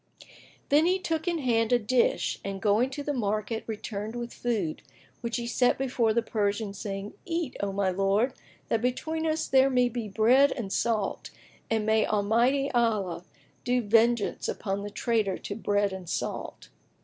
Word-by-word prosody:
Then 300 +4 +5
he 370 +1 +3
took 325 -2 -3
in 345 -1 +1
hand 230 -5 +1
a 245 - +6
dish 240 +2 +1
and 195 -1 -4
going 215 +5 +2
to 285 +2 -5
the 290 - -2
market, 215 -1 -2
returned 215 0 -5
with 240 0 -5
food, 210 -10 -2 0.4
which 235 0 -2
he 240 - -3
set 245 +1 +2
before 250 -4 +1
the 235 +1 +1
Persian, 205 -1 -1
saying, 195 0 -5
"Eat, 335 -6 -3
O 200 -1 -1
my 195 -1 0
lord, 195 +7 +1 0.3
that 225 - 0
between 315 +6 -1
us 315 0 0
there 265 0 +5
may 250 -2 +3
be 235 -2 -4
bread 250 +7 +4
and 200 -6 -5
salt 215 -3 -1 0.4
and 220 -1 0
may 220 0 +3
Almighty 235 +7 +2
Allah 215 -8 0 0.4
do 250 +1 +2
vengeance 225 +1 +2
upon 195 -1 -3
the 205 - -5
traitor 215 -3 0
to 200 - -6
bread 205 -2 0
and 185 -3 -7
salt!" - - -4
230 Hz, 170 wpm, -28 LUFS, 205-250 Hz, 0.4 s, a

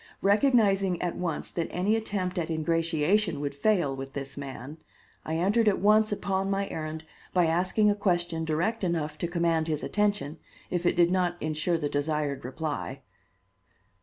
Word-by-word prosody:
Recognizing 200 -4 +3
at 175 -1 -2
once 170 -3 -3
that 170 -2 -2
any 195 +5 +1
attempt 200 -5 -2
at 165 - -2
ingratiation 165 +3 +1
would 145 -1 -3
fail 150 -2 +1
with 135 0 -7
this 140 0 -5
man, 140 +2 -7 0.4
I 160 - -3
entered 205 +7 +2
at 205 - +4
once 215 +1 +4
upon 195 -1 -1
my 195 0 0
errand 155 0 -5 0.3
by 180 -1 +5
asking 185 +6 +2
a - - 0
question 175 -5 0
direct 170 +8 -1
enough 155 -4 -1
to 170 - -1
command 170 -2 +1
his 155 -2 -2
attention, 205 -7 0 0.3
if 175 -1 0
it - - +2
did 175 0 +4
not 180 -1 +1
insure 155 +2 0
the 150 -2 -1
desired 145 -1 -1
reply. 145 +4 -4
170 Hz, 165 wpm, -28 LUFS, 155-195 Hz, 0.4 s, by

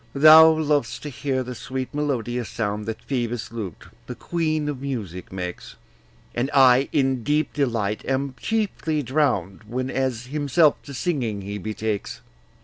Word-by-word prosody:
Thou 155 +3 +9
lovest 145 -6 0
to 150 - -5
bear 135 -3 0
the 125 0 -6
sweet 130 +2 -5
melodious 125 -5 -2
sound 105 -1 -3
That 110 - -5
Phoebus' 120 -4 -3
lute, 105 -7 -6 0.2
the - - -6
queen 155 -3 -1
of 140 -3 -4
music, 105 -10 -5
makes; 90 -2 -6 0.6
And 120 +3 -1
I 130 0 +6
in 135 -4 +1
deep 150 +2 0
delight 115 -7 -1
am 135 0 -1
chiefly 195 -9 -1
drown'd 120 - 0
Whenas 130 0 -2
himself 145 +3 +2
to 140 - -8
singing 120 - -1
he 100 +1 -5
betakes. 105 - -4
130 Hz, 140 wpm, -23 LUFS, 110-145 Hz, 0.6 s, Thou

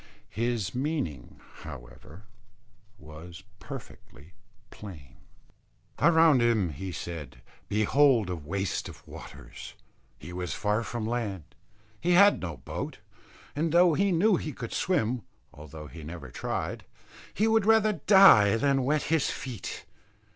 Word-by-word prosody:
His 115 -4 -1
meaning, 125 - -4 0.2
however, 65 - -11 0.7
was 85 +2 -12 0.2
perfectly 75 +7 -11 0.4
plain. 75 -11 -11 0.8
Around 160 -5 +5
him, 115 -6 +2
he 90 +6 -6
said, 85 -1 -7 0.3
behold 115 +2 +3
a 90 - -3
waste 95 +5 -3
of - - -14
waters; - - -11 0.4
he 90 - -10
was 90 -1 -4
far 105 +2 0
from 115 -1 -4
land; 110 -7 -3 0.6
he 175 +2 +1
had 200 +3 +6
no 85 -4 -5
boat; - - -6 0.6
and 160 +2 0
though 175 0 +5
he 195 +5 +2
knew 185 +3 +3
he 155 - -5
could 115 -2 -7
swim, 125 -10 0 0.3
although 75 +1 -10
he 80 +2 -11
never 75 -4 -8
tried, - - -4 0.5
he 215 - +1
would 220 -2 +2
rather 220 -1 +4
die 190 - +6
than 135 +2 +1
wet 150 +3 +1
his 160 -3 +1
feet. 125 -7 -6
110 Hz, 125 wpm, -28 LUFS, -, 0.8 s, had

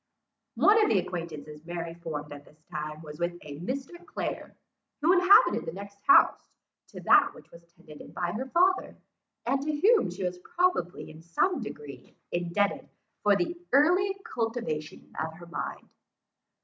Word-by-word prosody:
One 435 +2 +5
of - - +2
the 210 - +3
acquaintances 155 -4 -5
Mary 170 0 -5
formed 155 -4 -6
at 145 0 -10
this 150 +1 -22
time 155 +1 -5
was 150 -1 -10
with 175 0 -1
a 145 -1 -9
Mr. 275 - -5
Clare, - - -5 0.4
who 325 +4 +4
inhabited 370 +3 +6
the 160 - -4
next 200 +1 -10
house - - +5 0.4
to - - -10
that - - +5
which - - -16
was 170 - -14
tenanted 160 -4 -13
by 175 -1 -2
her 250 +8 -4
father, 365 +6 +2 0.5
and 270 +3 +1
to 295 +1 -2
whom 430 - +4
she 185 +2 -6
was 180 0 -3
probably 350 - -1
in 155 +1 -13
some 260 - 0
degree 145 - -9
indebted 175 +4 -1 0.3
for 205 -1 +4
the 200 - -1 0.2
early 360 +8 +4
cultivation 225 -10 -4
of 160 0 -5
her 170 +1 -12
mind. 170 - -6
180 Hz, 160 wpm, -28 LUFS, -, 0.5 s, inhabited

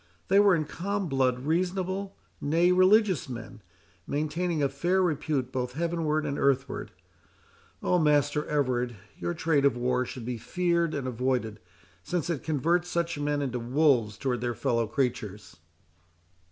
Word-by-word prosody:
They 195 +1 +6
were 200 -2 +6
in 155 -2 -1
calm 200 +5 -3
blood 130 -3 +1
reasonable, 185 +5 -1 0.3
nay, 165 +5 +3
religious 185 -3 +4
men, 120 -2 -8 0.5
maintaining 155 +2 -1
a - - +4
fair 170 +8 0
repute 150 -6 0
both 125 -1 -3
heavenward 160 -1 -1
and 140 -1 -2
earthward. 135 -1 0 0.9
Oh, 180 - +2
Master 150 -1 +2
Everard, 125 -5 0 0.2
your 175 - -2
trade 160 -3 +1
of 140 -4 +3
war 125 +1 +1
should 125 -2 -7
be 120 -1 -4
feared 170 +1 0
and 135 -2 -3
avoided, 125 -3 -1 0.4
since 170 - -2
it 150 - -3
converts 165 +4 0
such 170 -3 -1
men 145 0 0
into 125 -3 -2
wolves 120 -4 +2
towards 125 -1 -2
their 120 -1 -2
fellow 115 0 0
creatures." 110 - -3
145 Hz, 145 wpm, -28 LUFS, 125-170 Hz, 0.9 s, They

